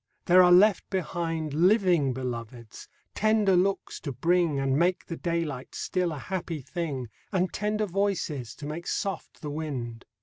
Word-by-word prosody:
there 180 Hz, +1 st, +7 dB
are 180 Hz, -1 st, +6 dB
left 190 Hz, +2 st, +5 dB
behind 165 Hz, -4 st, -2 dB
Living 175 Hz, -, +3 dB
Beloveds, 120 Hz, -2 st, -6 dB, 0.3 s
tender 215 Hz, -3 st, +3 dB
looks 195 Hz, +2 st, 0 dB
to 140 Hz, -, -5 dB
bring, 165 Hz, +2 st, +1 dB
And 135 Hz, -1 st, +1 dB
make 175 Hz, +4 st, +1 dB
the 165 Hz, -, -5 dB
daylight 165 Hz, -7 st, -3 dB
still 180 Hz, -2 st, -1 dB
a 155 Hz, -, -5 dB
happy 170 Hz, -1 st, -4 dB
thing, 145 Hz, -6 st, -4 dB, 0.2 s
And 185 Hz, -2 st, 0 dB
tender 210 Hz, +1 st, 0 dB
voices, 175 Hz, -, -2 dB
to 150 Hz, -, -9 dB
make 155 Hz, +4 st, -5 dB
soft 195 Hz, -4 st, -3 dB
the 150 Hz, -, -4 dB
wind. 130 Hz, -7 st, -5 dB
170 Hz, 155 wpm, -27 LUFS, 140-185 Hz, 0.3 s, there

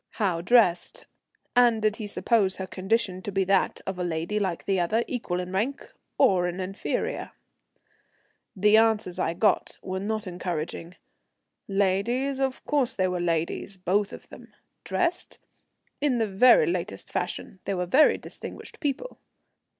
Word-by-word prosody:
How 185 Hz, -6 st, 0 dB
dressed, 180 Hz, -4 st, +2 dB, 0.5 s
and 240 Hz, -2 st, +5 dB
did 215 Hz, 0 st, +1 dB
he 215 Hz, -3 st, -5 dB
suppose 205 Hz, -2 st, +1 dB
her 190 Hz, -, -4 dB
condition 190 Hz, 0 st, -1 dB
to 205 Hz, -, -5 dB
be 195 Hz, 0 st, +1 dB
that 195 Hz, 0 st, +1 dB
of 190 Hz, -1 st, -4 dB
a -, -, -1 dB
lady 170 Hz, +4 st, -2 dB
like 185 Hz, -4 st, -2 dB
the 195 Hz, -2 st, +1 dB
other, 215 Hz, +7 st, +1 dB
equal 225 Hz, -8 st, -2 dB
in 180 Hz, 0 st, -5 dB
rank, 230 Hz, +9 st, -2 dB, 0.2 s
or 180 Hz, -2 st, +4 dB
an 175 Hz, +1 st, -4 dB
inferior? 190 Hz, +2 st, -3 dB, 1.2 s
The 210 Hz, +2 st, +5 dB
answers 220 Hz, -5 st, +2 dB
I 165 Hz, -, 0 dB
got 210 Hz, +4 st, +1 dB
were 185 Hz, 0 st, -3 dB
not 215 Hz, +2 st, -3 dB
encouraging. 175 Hz, -1 st, -5 dB, 0.7 s
Ladies? 205 Hz, +8 st, 0 dB
Of 265 Hz, -1 st, -2 dB
course 280 Hz, -5 st, 0 dB
they 185 Hz, -1 st, +1 dB
were 180 Hz, -1 st, -2 dB
ladies, 170 Hz, +3 st, -2 dB
both 195 Hz, +3 st, 0 dB
of -, -, -11 dB
them. -, -, -14 dB, 0.3 s
Dressed? 355 Hz, -1 st, -1 dB, 0.6 s
In 280 Hz, -4 st, +2 dB
the 225 Hz, -, +2 dB
very 250 Hz, -, +5 dB
latest 350 Hz, -, -4 dB
fashion. 190 Hz, -, -4 dB
They 195 Hz, -, -1 dB
were 180 Hz, 0 st, -1 dB
very 270 Hz, -, +5 dB
distinguished -, -, -10 dB
people. 300 Hz, -, -3 dB
195 Hz, 150 wpm, -26 LUFS, 180-230 Hz, 1.2 s, and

